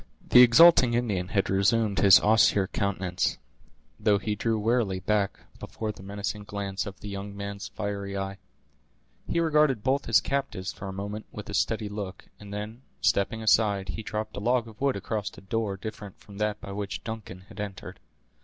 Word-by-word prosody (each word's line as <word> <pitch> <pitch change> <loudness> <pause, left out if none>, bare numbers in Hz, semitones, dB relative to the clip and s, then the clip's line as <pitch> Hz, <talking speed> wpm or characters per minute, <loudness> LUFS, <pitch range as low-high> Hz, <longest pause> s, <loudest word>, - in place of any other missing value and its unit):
The 125 - +9
exulting 125 -1 +7
Indian 105 -7 -1
had 100 0 0
resumed 100 +2 +2
his 100 -1 +8
austere 105 -2 +4
countenance, 95 -2 -1 0.6
though 105 -1 +3
he 105 +1 -2
drew 110 +2 0
warily 110 -3 +1
back 100 +1 0 0.2
before 110 -1 -5
the 105 - -13
menacing 100 +1 -4
glance 100 -1 -4
of 100 - -9
the - - -7
young 100 0 -6
man's 100 0 -5
fiery 100 -1 -4
eye. 95 0 -4 0.9
He 170 - 0
regarded 150 -8 +2
both 135 +2 +1
his 110 -5 +5
captives 95 -7 -3
for 95 - -8
a - - -4
moment 100 +2 -6
with 105 - -8
a - - -7
steady 110 -2 0
look, 105 -2 -7
and 105 -1 -11
then, 105 +4 -6 0.2
stepping 110 +3 +1
aside, 100 -3 +3
he 110 - -4
dropped 110 0 -4
a - - -4
log 120 +2 +1
of 110 +1 -14
wood 140 -1 +2
across 105 +1 -3
a - - -11
door 100 0 -2
different 105 -1 -8
from 100 0 -13
that 105 -1 -1
by 100 - -8
which 100 0 -5
Duncan 110 -5 -7
had 95 +1 -14
entered. 100 -2 -7
105 Hz, 180 wpm, -27 LUFS, 100-110 Hz, 0.9 s, The